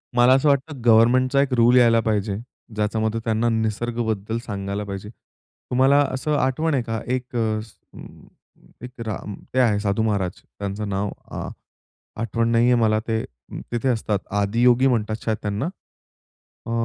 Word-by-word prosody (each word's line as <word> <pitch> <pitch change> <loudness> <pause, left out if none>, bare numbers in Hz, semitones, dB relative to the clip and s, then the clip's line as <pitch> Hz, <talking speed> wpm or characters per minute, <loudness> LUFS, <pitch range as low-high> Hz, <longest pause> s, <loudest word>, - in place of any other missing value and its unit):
मला 120 +1 +6
असं 135 +3 +3
वाटतं 140 0 0
गव्हर्नमेंटचा 125 +4 +5
एक 140 -2 0
रूल 120 +1 +5
यायला 115 -2 +5
पाहिजे. 105 -2 0 0.4
ज्याच्यामध्ये 110 +1 0
त्यांना 115 +1 +1
निसर्गबद्दल 110 -1 -1
सांगायला 100 -1 -4
पाहिजे. 100 +1 -6
तुम्हाला 130 +4 -1
असं 150 +3 -1
आठवण 155 +5 0
आहे 130 -3 +1
का? 115 -1 -3
एक 125 0 -3 1.5
एक 125 -1 -9
राम 105 -1 -5 0.2
ते 130 - +2
आहे, 110 -5 +3
साधू 105 +1 0
महाराज. 100 -5 -1 0.2
त्यांचं 100 +1 -4
नाव 100 +1 -1 0.3
आ - - -4 0.7
आठवण 115 +1 0
नाहीये 120 +2 +4
मला 110 -2 +2
ते, 110 -1 0 0.5
तिथे 120 +2 0
असतात. 110 -4 0 0.2
आदियोगी 120 +5 +3
म्हणतात 110 -3 0
शायद 110 -1 0
त्यांना. 105 +4 -2 1.0
अ, - - -5
115 Hz, 140 wpm, -23 LUFS, 105-125 Hz, 1.5 s, मला